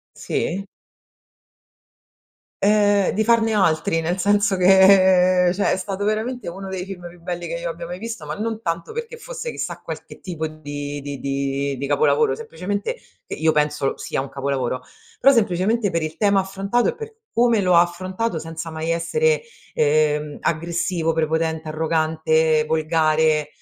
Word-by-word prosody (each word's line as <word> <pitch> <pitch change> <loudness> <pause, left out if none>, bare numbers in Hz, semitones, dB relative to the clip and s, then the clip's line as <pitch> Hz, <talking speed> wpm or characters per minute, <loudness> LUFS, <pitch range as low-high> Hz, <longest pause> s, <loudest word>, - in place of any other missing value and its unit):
Sì. 190 +4 -2 2.0
Ehm, 205 -1 +4
di 220 +1 0
farne 225 -1 +3
altri, 165 -5 +2
nel 170 +3 -2
senso 205 +1 +2
che 185 -1 +6
cioè 200 - +1
è - - +1
stato 195 +1 -4
veramente 220 +2 -2
uno 195 +3 -7
dei 185 -1 -4
film 180 -3 -8
più 175 0 -16
belli 175 0 -5
che 165 - -4
io 170 0 -4
abbia 165 +1 -7
mai 180 +1 -6
visto, 230 +1 -6
ma - - -4
non 225 +1 -4
tanto 165 -1 -3
perché 470 +1 -5
fosse - - -6
chissà - - -5
qualche - - -8
tipo 165 -4 -4
di 145 -2 -6
di 140 -1 -6
di 140 0 -2
di 140 +2 -4
capolavoro, 140 -1 +2
semplicemente 200 - -4 0.3
i - - -7
io 160 0 +4
penso 150 -2 0
sia - - -3
un 140 - -8
capolavoro, 135 -2 -2 0.4
però 275 +2 +7
semplicemente 205 0 +1
per 165 -1 -1
il 155 0 -4
tema 200 -2 +3
affrontato 195 +5 0
e 485 - -1
per 450 -1 -9 0.2
come 235 -2 +3
lo 180 -2 +2
ha 170 - +8
affrontato, 185 +3 -3
senza 165 +1 -6
mai 160 +1 -3
essere, 465 - +1 0.3
ehm, 150 0 +1
aggressivo, 170 0 -1
prepotente, 160 0 -1
arrogante, 160 0 +1
volgare 155 -1 +2
170 Hz, 160 wpm, -22 LUFS, 155-200 Hz, 2.0 s, ha